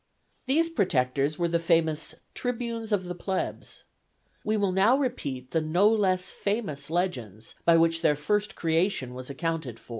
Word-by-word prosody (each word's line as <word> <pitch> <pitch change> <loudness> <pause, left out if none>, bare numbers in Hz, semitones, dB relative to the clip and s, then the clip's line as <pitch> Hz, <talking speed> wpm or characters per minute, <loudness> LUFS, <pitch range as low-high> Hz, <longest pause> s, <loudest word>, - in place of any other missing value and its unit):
These 325 +5 +2
protectors 145 - +1
were 175 - +1
the 170 0 +1
famous 160 -2 +1 0.2
Tribunes 235 -2 -3
of 200 -3 +2
the 180 0 -5
Plebs. 190 +2 -4 0.6
We 215 0 +1
will 200 -2 +1
now 200 +8 +4
repeat 140 - -3
the 165 - +1
no 175 +6 +3
less 190 -4 +2
famous 195 -10 -3
legends 125 - -3
by 170 -1 +6
which 165 0 +3
their 150 -3 +3
first 210 +8 -1
creation 165 -5 0
was 130 +1 -8
accounted 155 -4 -3
for. - - -22
170 Hz, 155 wpm, -27 LUFS, 150-205 Hz, 0.6 s, by